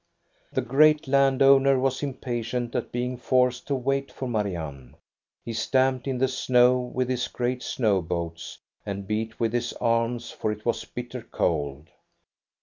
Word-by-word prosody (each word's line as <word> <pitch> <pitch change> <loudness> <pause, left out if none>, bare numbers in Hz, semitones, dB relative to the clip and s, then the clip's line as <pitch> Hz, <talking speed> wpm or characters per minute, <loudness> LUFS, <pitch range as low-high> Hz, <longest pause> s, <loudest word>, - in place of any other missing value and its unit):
The - - -1
great 150 +4 +4
land 135 -1 +3
owner 135 0 +6
was 130 0 0
impatient 120 -3 -3
at - - -3
being 125 +1 -2
forced 125 0 +1
to 140 - 0
wait 135 +2 -1
for 130 - -5
Marianne. 85 - -4 0.5
He 115 - -4
stamped 130 +3 +1
in 130 -2 -1
the 130 +1 +2
snow 125 -1 +3
with 125 0 -2
his 125 -1 -1
great 125 0 -2
snow 105 -8 +1
boots 85 0 -5 0.3
and 100 -1 -5
beat 110 +2 -3
with 115 -1 0
his 120 - -1
arms, 115 0 0
for 110 - -2
it 105 0 -7
was 120 - -1
bitter 125 0 -7
cold. 75 -8 -2
125 Hz, 155 wpm, -26 LUFS, 110-130 Hz, 0.5 s, owner